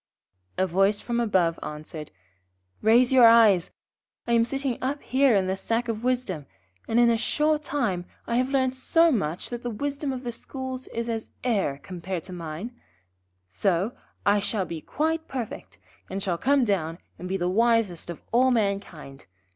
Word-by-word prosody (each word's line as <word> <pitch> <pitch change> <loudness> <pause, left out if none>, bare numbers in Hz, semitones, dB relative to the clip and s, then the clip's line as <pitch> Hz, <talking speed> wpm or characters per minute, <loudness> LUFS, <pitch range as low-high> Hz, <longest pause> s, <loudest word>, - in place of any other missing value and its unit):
A 190 - +3
voice 195 +3 +2
from 240 -1 -2
above 185 -8 +2
answered: 150 0 -7 0.7
'Raise 240 +4 +5
your 250 -3 +8
eyes, 220 -6 +6 0.6
I - - -3
am 230 0 +4
sitting 270 0 -2
up 280 +3 -2
here 265 -2 +3
in 195 -2 +2
the 190 +1 0
Sack 230 +4 -1
of 225 -1 -3
Wisdom, 245 - -1 0.4
and 225 - +2
in 240 -1 +6
a 230 - +2
short 300 +6 +1
time 235 -12 -1 0.2
I 235 - 0
have 255 +1 +1
learnt 260 -2 +1
so 330 +6 +3
much 175 - -2
that 240 -1 -4
the 245 - -3
wisdom 285 +5 -3
of 260 0 -5
the 240 - -3
schools 260 +2 -6
is 230 0 -4
as 225 -1 -3
air 195 - 0
compared 180 -1 -5
to 185 - -9
mine. 170 +6 -6 0.8
Soon 175 - 0 0.3
I 205 +1 +4
shall 200 -1 -1
be 165 -3 -6
quite 320 - -1
perfect, 250 -4 -6 0.3
and 195 +1 -4
shall 175 -3 -1
come 275 -1 +3
down 170 -6 -1 0.2
and 180 - -6
be 190 - 0
the 175 -1 -1
wisest 220 -3 +1
of 170 - -7
all 250 +3 +4
mankind. 200 - -2
225 Hz, 175 wpm, -26 LUFS, 185-255 Hz, 0.8 s, your